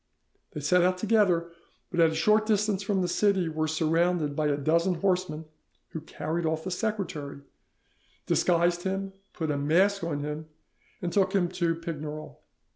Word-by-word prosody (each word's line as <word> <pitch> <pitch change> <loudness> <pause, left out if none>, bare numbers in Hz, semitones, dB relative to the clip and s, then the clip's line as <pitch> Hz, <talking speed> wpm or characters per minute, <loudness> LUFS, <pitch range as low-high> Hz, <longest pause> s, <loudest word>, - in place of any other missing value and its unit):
They 150 - -5
set 180 +5 +3
out 185 +1 +2
together, 185 -5 +2 0.4
but 175 - -2
at 165 -1 +6
a 160 - -4
short 215 +6 +3
distance 210 -2 +1
from 195 -2 0
the - - 0
city 190 -1 +2
were 155 0 -1
surrounded 160 -1 +1
by 155 0 +1
a 145 -1 +1
dozen 170 +5 +1
horsemen, 180 -4 -1 0.4
who 160 - -6
carried 160 +1 -4
off 160 0 -1
the 185 - -4
secretary, 180 -9 -3 0.8
'disguised 175 0 +2
him, 195 +1 -3 0.2
put 160 -3 -3
a 145 - -1
mask 185 +7 +2
on 150 -4 -2
him, 150 +2 -5 0.6
and 175 - -2
took 190 -1 +2
him 180 -3 +2
to 170 -2 0
Pignerol. 155 -2 -6
170 Hz, 165 wpm, -27 LUFS, 155-190 Hz, 0.8 s, at